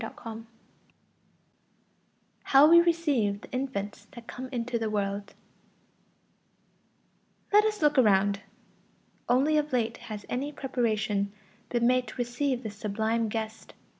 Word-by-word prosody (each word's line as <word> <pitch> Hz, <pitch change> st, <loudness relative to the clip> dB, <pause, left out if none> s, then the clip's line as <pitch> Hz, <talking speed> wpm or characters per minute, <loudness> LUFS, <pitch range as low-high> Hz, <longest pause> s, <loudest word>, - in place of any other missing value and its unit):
=How 275 Hz, +2 st, +7 dB
we 340 Hz, +1 st, +8 dB
receive 290 Hz, -13 st, +1 dB
the -, -, -13 dB
infants 250 Hz, -6 st, -4 dB
that 235 Hz, -3 st, -11 dB
come 255 Hz, +3 st, -7 dB
into 240 Hz, -1 st, -2 dB
the 220 Hz, -1 st, -1 dB
world=. 200 Hz, -1 st, -3 dB, 2.2 s
Let 420 Hz, +1 st, +6 dB
us 425 Hz, -6 st, -1 dB
look 295 Hz, -2 st, +4 dB
around. 200 Hz, -3 st, +4 dB, 0.9 s
Only 275 Hz, +5 st, +3 dB
of 300 Hz, 0 st, -3 dB
late 235 Hz, -3 st, 0 dB
has 210 Hz, -2 st, -8 dB
any 275 Hz, +4 st, -3 dB
preparation 220 Hz, -7 st, -1 dB, 0.4 s
been 240 Hz, -1 st, +1 dB
made 255 Hz, 0 st, +3 dB
to -, -, -9 dB
receive 245 Hz, +1 st, -1 dB
this 210 Hz, -2 st, -7 dB
sublime 220 Hz, +2 st, -1 dB
guest. 220 Hz, 0 st, -5 dB
240 Hz, 115 wpm, -28 LUFS, 215-270 Hz, 2.2 s, we